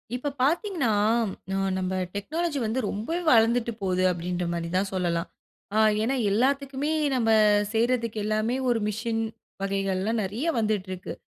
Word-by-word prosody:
இப்ப 285 +3 -3
பார்த்தீங்ன்னா, 335 - +1 0.6
நான் 195 -1 0
நம்ப 185 0 -2 0.2
டெக்னாலஜி 300 - -2
வந்து 220 +4 -1
ரொம்பவே 325 - -3
வளந்துட்டு 235 0 +4
போது 185 -1 +1
அப்பிடின்றமாரி 170 -1 -3
தான் 195 +1 0
சொல்லலாம். 175 -2 -1 0.5
அ - - +1 0.3
ஏன்னா 260 +4 +1 0.2
எல்லாத்துக்குமே, 275 +5 0 0.2
நம்ம 230 -3 +1 0.4
செய்றதுக்கு 230 -1 +1
எல்லாமே, 215 +3 0
ஒரு 235 -2 +2
மிஷின் 225 +2 -2 0.4
வகைகள்லாம் 195 +2 -1
நிறைய 210 - -3
வந்துட்டு 210 -3 0
இருக்கு. 185 -1 -6
220 Hz, 130 wpm, -26 LUFS, 190-255 Hz, 0.6 s, வளந்துட்டு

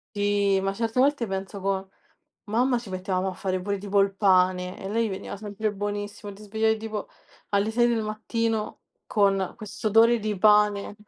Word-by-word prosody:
Sì, 205 -1 +2
ma 195 0 -1
certe 230 +3 -2
volte 275 -3 +2
penso 195 +1 -5
co 190 0 -2 0.6
mamma 245 +4 +1
ci 235 -3 -10
mettevamo 185 0 -2
a - - -3
fare 185 0 -2
pure 200 +2 -2
tipo 200 0 +1
il 195 0 +2
pane 185 -2 +2
e - - -10
a - - -3
lei 225 +2 0
veniva 190 0 -6
sempre 210 +1 -3
buonissimo, 205 0 -5
ti 200 +2 -14
svegliavi 220 +1 +1
tipo 215 -1 -5 0.4
alle 200 +1 +1
6 240 +1 +3
del 230 -2 +1
mattino 220 +1 -2 0.2
con 195 -3 +1
questo 225 +2 -4
odore 230 +3 +5
di 210 -1 -2
pane. 210 0 +4
205 Hz, 180 wpm, -26 LUFS, 195-220 Hz, 0.6 s, odore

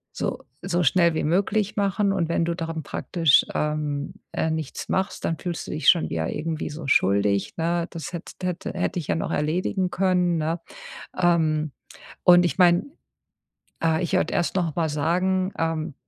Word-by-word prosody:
so - - -3 0.2
so 180 -1 0
schnell 170 +2 +3
wie - - -1
möglich 200 +5 +1
machen. 200 0 +1
Und 170 -4 -1
wenn 170 0 +1
du 170 0 -1
dann 165 -2 -4
praktisch, 165 0 +2
ähm, 150 -1 -2 0.2
äh, 160 - -1
nichts 160 -3 -4
machst, 190 +1 -1
dann 165 - -1
fühlst 175 -2 -5
du - - -5
dich 155 - +2
schon 170 - +4
wieder 80 -1 -2
irgendwie 160 0 -3
so 150 -1 -7
schuldig, 100 -3 +2
ne? 170 +1 0
Das 165 +1 -7
hätt 170 - -6
hätte 180 -1 -3
hätte 180 -1 -1
ich 155 - -7
ja - - +1
noch 165 - -2
erledigen 180 +5 0
können, 180 -2 +1
ne? 160 +2 -1 0.6
Ähm, 160 -4 +2 0.5
und 175 -1 +7
ich 175 - -1
meine 175 0 +5 1.0
ah, 160 -1 +2
ich 175 - -2
wollte - - +1
erst 175 +2 0
noch 170 -5 0
mal 165 -2 +1
sagen, 185 +6 0
ähm, 160 -2 -2
165 Hz, 175 wpm, -24 LUFS, 155-180 Hz, 1.0 s, und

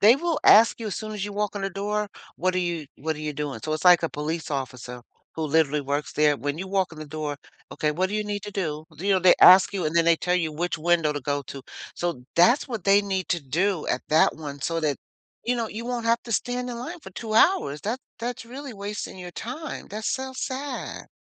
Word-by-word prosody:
they 225 +6 +7
will 335 0 -1
ask 225 +2 +7
you 225 - -4
as 200 - -4
soon 215 -1 -5
as 205 -1 -3
you 205 - -5
walk 210 0 -2
in 200 - -4
the 195 - -1
door, 205 +2 -2 0.3
"What 185 +1 0
are - - +1
you 170 -4 -2
what 160 +1 -3
are - - -8
you 155 0 -3
doing?" 145 -1 -4
So, 155 - -2
it's 155 +4 -1
like 175 -1 +8
a 165 - -1
police 155 +3 -4
officer 125 -3 -5 0.3
who 160 - -3
literally 150 -1 +2
works 145 +2 -2
there. 150 -1 +3
When 145 +2 -3
you 190 +1 -5
walk 190 -3 0
in 155 - -11
the 155 - -7
door, 150 -1 -4 0.3
"Okay, 150 - 0
what 185 +5 0
do - - -3
you 210 - 0
need 205 -1 -3
to 210 - -6
do?" 160 -6 -3
You 195 +3 +1
know, 190 - +4
they 180 0 +6
ask 185 +2 +9
you, 185 -5 -1
and 160 +2 -1
then 165 - +5
they 165 -1 +5
tell 180 +2 0
you 165 -4 0
which 175 +3 -2
window 165 -2 +2
to 145 - -3
go 145 0 -1
to. 135 +1 -8 0.3
So, 170 -8 -3
that's 240 - +4
what 225 -7 -5
they 200 0 +6
need 190 -2 -3
to 170 - +1
do 175 +5 0
at - - -1
that 155 0 +4
one 145 -3 -7
so 165 +4 -1
that, 150 -3 0 0.4
you 245 +1 0
know, 230 -2 -2
you 230 +2 -6
won't 245 -2 -2
have 230 +1 +2
to 235 - -5
stand 245 +2 -1
in 240 - -4
line 330 +7 -6
for 190 - -11
2 220 +3 -6
hours, 215 - +3
that 230 +5 -2 0.2
that's 240 0 -4
really 255 +1 -8
wasting 200 -1 -6
your 180 -1 -7
time, 275 - -6
that's 215 +2 -3
so 265 -1 -3
sad. 265 +1 -5
185 Hz, 255 wpm, -25 LUFS, 155-215 Hz, 0.4 s, ask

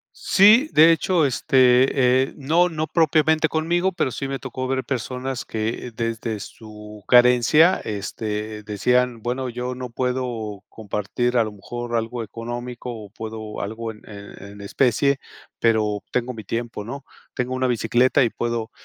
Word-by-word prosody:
Sí, 245 - +5
de 160 +2 +7
hecho, 165 0 +2
este, 130 0 +3
eh, 135 - -6
no 160 +5 +2
no 160 -2 -3
propiamente 160 -1 +3
conmigo, 170 +4 0
pero 170 -7 -1
sí 135 - -4
me 135 0 -4
tocó 130 +2 -5
ver 130 0 -1
personas 130 0 -4
que, 115 +2 -4
desde 115 -1 -3
su 105 0 -11
carencia, 125 +8 +5
este, 105 +1 -4
decían: 120 +3 0
"Bueno, 125 +3 -3
yo 125 +1 -4
no 125 -1 -7
puedo 120 -5 -3
compartir 110 +4 -2
a 115 - +4
lo 110 - -5
mejor 120 +4 -6
algo 115 +1 -2
económico, 120 +2 -6
o 110 -3 -9
puedo 110 -1 -7
algo 110 +2 -5
en 105 - -16
en 100 -2 -11
en 100 0 -11
especie, 135 +6 +1 0.4
pero 105 -3 +1
tengo 125 0 -1
mi 110 -2 -9
tiempo", 115 +1 -4
¿no? 135 +5 -8 0.3
"Tengo 125 -1 -2
una 130 0 0
bicicleta 125 +3 +2
y 120 - 0
puedo 115 -1 -3
120 Hz, 155 wpm, -22 LUFS, 110-135 Hz, 0.4 s, de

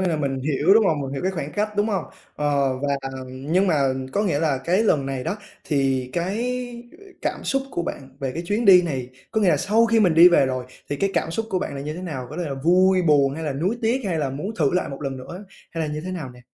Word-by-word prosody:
nghĩa 190 - +1
là 165 - 0
mình 135 -3 -2
hiểu, 150 +7 +3
đúng 220 -2 +5
hông? 155 -5 +1
Mình 135 -1 -4
hiểu 140 - -4
cái 190 +1 0
khoảng 150 -4 -5
cách, 210 +1 -1
đúng 205 +1 +2
hông? 195 -6 -1 0.3
Ờ, 140 -3 +1
và 140 0 0 0.3
nhưng 145 +9 0
mà 175 - +3 0.4
có 205 - +1
nghĩa 170 -8 +1
là 150 -5 +1
cái 185 +8 +1
lần 150 -11 +2
này 135 -2 -3
đó 200 - -2 0.3
thì 135 -3 0
cái 235 +7 -3 0.4
cảm - - -3
xúc 270 0 0
của 175 - -2
bạn 135 -5 -6
về 135 -2 -2
cái 165 - -4
chuyến 210 +5 0
đi 185 -3 +8
này 135 -7 -3 0.2
có 220 - 0
nghĩa 200 - +3
là - - +4
sau 225 +3 +3
khi 230 -1 +3
mình 180 -6 +4
đi 170 +2 +9
về 170 -6 +4
rồi, 130 -1 -2 0.2
thì 145 - -2
cái 195 +5 0
cảm 165 - 0
xúc 225 +6 -2
của 185 - +1
bạn 145 - -4
là 135 - -5
như 150 +2 -4
thế 180 - -7
nào? 135 -8 -5
Có 150 - -7
thể 175 - -2
là 140 - -3
vui 180 +6 +3
buồn 140 -4 +3
hay 160 +1 -5
là 145 - -1
nuối 185 - -1
tiếc 240 +4 +1
hay 170 -4 -1
là 140 -3 -1
muốn 190 +11 -5
thử 145 -8 +2
lại 180 - 0
một 140 +1 -7
lần 135 -1 -3
nữa 175 +10 -9 0.3
hay 160 -2 -3
là 150 - -4
như 150 - -3
thế 180 +4 -6
nào 150 -8 -5
nè? 125 - -15
160 Hz, 280 wpm, -23 LUFS, 140-190 Hz, 0.4 s, đi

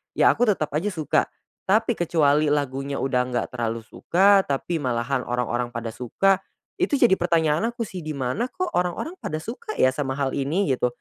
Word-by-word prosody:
ya - - +5
aku 245 0 +1
tetap 185 -7 +1
aja 155 +8 -1
suka. 160 -8 0 0.4
Tapi 220 +4 +3
kecuali 155 -6 +2
lagunya 140 -1 -1
udah 130 -2 +1
nggak 125 -1 -1
terlalu 115 -2 -3
suka, 195 - +3
tapi 150 +4 -1
malahan 125 0 -1
orang-orang 120 0 -2
pada 115 -1 -4
suka 185 - +1 0.4
itu 285 - +2
jadi 240 -7 +5
pertanyaan 165 +2 +2
aku 235 - -2
sih, 190 -4 -7
"Dimana 155 - -2
kok 365 +8 -4
orang-orang 180 - -2
pada 155 +1 -4
suka 430 - -6
ya 130 - +4
sama 135 0 -3
hal 140 -1 -1
ini?" 150 +6 0
Gitu. 125 -1 +1
150 Hz, 175 wpm, -24 LUFS, 130-195 Hz, 0.4 s, ya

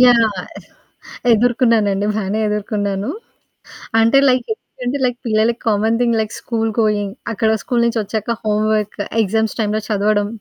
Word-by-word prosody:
Yeah! 235 -4 +5 1.0
ఎదుర్కున్నానండి, 225 -3 +2
బానే 210 0 -1
ఎదుర్కున్నాను. 205 -1 -2 0.9
అంటే 230 +4 +4
like 255 -1 +1
ఎందుకంటే 255 - -5
లైక్ 245 -1 -1
పిల్లలకి 225 +1 +1
common 220 +1 +2
thing. 235 -2 +2
Like 215 - -4
school 225 -2 -1
going, 205 -2 +1 0.2
అక్కడ 220 +1 +1
స్కూలు 240 -2 0
నుంచొచ్చాక 225 0 -1
హోంవర్క్, 215 0 0 0.2
ఎగ్జామ్స్ 220 +2 -1
టైమ్‌లో 215 0 0
చదవడం 205 0 +1
220 Hz, 120 wpm, -18 LUFS, 210-230 Hz, 1.0 s, Yeah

